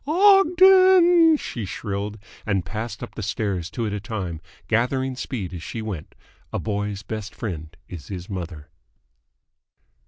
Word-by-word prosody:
"Ogden!" 370 -2 +6
she 120 - -5
shrilled; 100 +2 -4 0.3
and 100 -5 0
passed 110 0 -5
up - - -8
the - - -6
stairs 100 -4 -2
two 115 +1 -3
at 105 - -2
a 105 - -2
time, 95 -7 -5 0.3
gathering 130 +3 0
speed 105 -8 -5
as 85 - -6
she 110 +6 -5
went. 100 -8 -6 0.4
A - - -2
boy's 105 -1 -3
best 110 +1 -6
friend 85 -7 -6
is 85 -6 -9
his 90 -2 -6
mother. 85 -6 -6
105 Hz, 145 wpm, -23 LUFS, 95-130 Hz, 0.4 s, Ogden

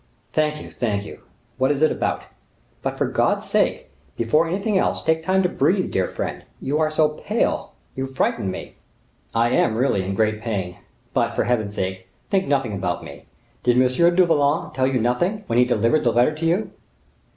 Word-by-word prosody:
"Thank 150 -1 +1
you! - - -11
thank 105 -4 -2
you! - - -10 0.4
What 130 +1 +3
is 145 +1 +1
it 155 - +5
about? - - -1 0.6
But, - - -3
for - - +1
God's - - 0
sake! - - 0 0.3
before 150 +9 +2
anything 200 +5 -1
else, 190 - +1
take 160 0 +1
time 190 +2 +2
to - - +3
breathe, 185 +1 +1
dear 95 -1 +1
friend. - - -5 0.2
You 145 +3 -1
are 155 -1 +2
so 155 0 +3
pale, 200 +4 -1 0.2
you 135 0 -2
frighten 130 -6 -1
me." 95 - -7 0.6
"I 115 +1 +3
am 115 -2 +2
really 125 -5 +2
in 95 +1 -3
great 110 0 +1
pain. 95 -6 -3 0.4
But, - - +1
for - - +2
Heaven's 110 -4 -1
sake, 95 0 -3 0.2
think 195 -1 +2
nothing 135 -6 +1
about 90 -3 -2
me. - - -11 0.4
Did 125 0 +3
M. 130 +7 +3
du 185 0 +6
Vallon 150 -2 +1
tell 130 0 +1
you 130 -1 +1
nothing, 175 - 0
when 115 +1 +1
he 125 - +6
delivered 125 +4 +2
the 120 - +3
letter 120 +6 +3
to 160 +2 -2
you?" 180 +6 0
130 Hz, 195 wpm, -22 LUFS, 115-160 Hz, 0.6 s, du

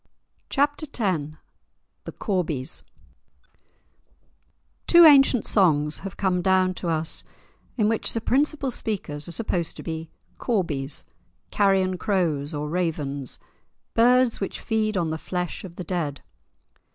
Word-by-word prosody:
*Chapter 290 +2 0
X* 185 - 0 0.8
*The - - -6
Corbies* 165 -10 -2 2.1
Two 345 -1 +8
ancient 275 -6 +6
songs 150 -6 +3
have 195 -1 -8
come 185 -2 +1
down 185 0 +3
to 175 - -4
us 160 0 -1 0.5
in 215 -3 +2
which 225 0 +1
the 230 - -1
principal 275 +3 0
speakers 150 -11 -4
are - - -7
supposed 175 -4 -1
to - - -8
be 160 -1 -5 0.3
Corbies, 155 - 0 0.5
carrion 190 -2 +2
crows 165 -8 0
or 150 -1 -3
ravens, 150 -5 -3 0.6
birds 245 0 +3
which 195 - -4
feed 215 -2 -1
on 165 -3 0
the 160 - -3
flesh 180 0 -4
of 180 -3 -10
the 180 - -6
dead. 160 -5 -3
185 Hz, 125 wpm, -24 LUFS, 160-220 Hz, 2.1 s, Two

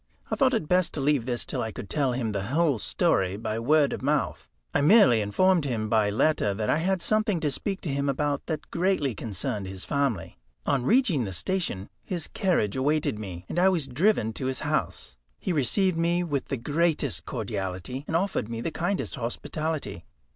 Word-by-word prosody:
I - - +2
thought 265 -3 +3
it 190 -9 -1
best 180 +1 +2
to - - -2
leave 140 -3 +1
this 120 -2 -1
till - - -3
I 110 - -3
could 100 - -8
tell 135 -1 +1
him 120 -3 -1
the 100 -1 -3
whole 145 -2 +2
story 95 -1 +1
by 110 0 -3
word 145 +4 +3
of - - -5
mouth. 140 - -1 0.2
I - - +2
merely 140 - +6
informed 175 - +3
him 115 -6 -2
by 110 -2 +3
letter 105 -2 +2
that 105 +1 0
I - - +3
had 185 +2 0
something 215 -4 +1
to 150 - +1
speak 195 +8 -3
to 150 - -3
him 140 0 0
about 145 +1 -1
that 155 -3 -4
greatly 170 -7 +1
concerned 100 -2 -3
his 95 0 -7
family. 140 - -1 0.3
On 135 -3 +1
reaching 225 - +3
the 100 - -4
station 105 - -1 0.2
his 175 -4 -4
carriage 180 - 0
awaited 140 -4 0
me, 90 -4 -7
and 175 - -2
I 190 +2 +6
was 165 -7 0
driven 145 - +2
to 130 - -3
his 130 - -2
house. 60 - -2 0.2
He 185 - -2
received 165 - +1
me 170 +1 +2
with 145 -6 -2
the 135 - -2
greatest 155 +6 0
cordiality, 105 - -4
and 160 - -2
offered 175 - 0
me 115 -1 -4
the 160 - -3
kindest 180 +5 -2
hospitality. 125 - -3
140 Hz, 195 wpm, -27 LUFS, 110-170 Hz, 0.3 s, merely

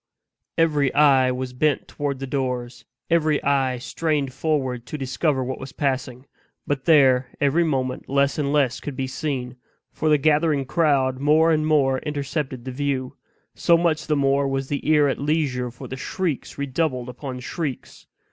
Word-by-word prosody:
Every 150 -4 +2
eye 135 -3 +5
was 125 0 -4
bent 145 +2 0
toward 145 -2 -3
the 135 - -5
doors 125 -2 -3 0.3
every 155 -3 +3
eye 135 -2 +1
strained 145 +1 -2
forward 130 -7 -1
to 150 - -5
discover 135 +1 0
what 130 +1 -4
was 130 - -8
passing. 130 -2 -2 0.4
But 135 -2 -2
there, 135 -5 +5
every 145 +4 +3
moment, 130 -5 -2
less 140 +2 +1
and 140 -1 0
less 140 -4 +1
could 145 - -6
be 135 - -2
seen, 130 -2 -4 0.3
for 155 - -1
the 150 - +5
gathering 150 -1 +2
crowd 135 -4 +1
more 155 +3 +4
and 155 -1 +1
more 135 -4 +3
intercepted 140 -3 -4
the 130 - -4
view; 130 -1 -2 0.4
so 170 - +3
much 160 -2 0
the 155 - +2
more 140 0 +2
was 135 0 -2
the 145 +1 -2
ear 150 -2 +5
at 135 - -1
leisure 140 -4 0
for 120 - -10
the 130 - -6
shrieks 165 +1 -3
redoubled 140 -2 -1
upon 125 +1 -6
shrieks. 140 +1 -6
140 Hz, 165 wpm, -23 LUFS, 130-150 Hz, 0.4 s, eye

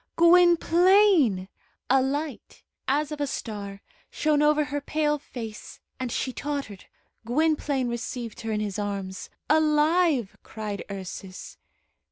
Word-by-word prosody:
"Gwynplaine!" 345 - +5 0.4
A 265 +1 +4
light, 285 +2 -4 0.2
as 295 +3 0
of 300 -1 -5
a 285 - 0
star, 200 -6 -6 0.3
shone 300 -1 +1
over 300 0 +4
her 290 0 -4
pale 300 +1 0
face, 225 -6 -9 0.2
and 255 -2 -3
she 255 - -2
tottered. 280 -10 -5 0.4
Gwynplaine 285 +1 0
received 235 -1 -5
her 225 -1 -4
in 210 0 -1
his 210 -1 -3
arms. 195 -2 -4 0.2
"Alive!" 305 - +2
cried 210 -2 -6
Ursus. 190 -1 -8
275 Hz, 120 wpm, -26 LUFS, 215-305 Hz, 0.4 s, Gwynplaine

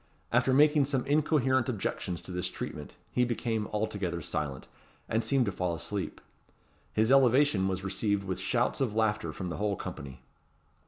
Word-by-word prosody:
After 120 +2 +3
making 150 +1 +5
some 135 -2 -1
incoherent 135 -3 +2
objections 95 -5 -3
to - - -7
this 90 0 -2
treatment, - - -7 0.2
he 125 - +2
became 115 -2 -1
altogether 100 -5 -2
silent, 75 -4 -4 0.4
and 115 +1 0
seemed 130 +2 +2
to 100 - -1
fall 90 -2 -1
asleep. 95 +5 -4 0.7
His 110 +3 +2
elevation 130 -6 +5
was 95 -1 -2
received 100 +1 0
with 95 -1 -3
shouts - - 0
of 115 -6 0
laughter 105 -7 +1
from 90 +4 -5
the - - -4
whole 105 -1 0
company. 65 -6 -7
105 Hz, 160 wpm, -30 LUFS, 95-130 Hz, 0.7 s, making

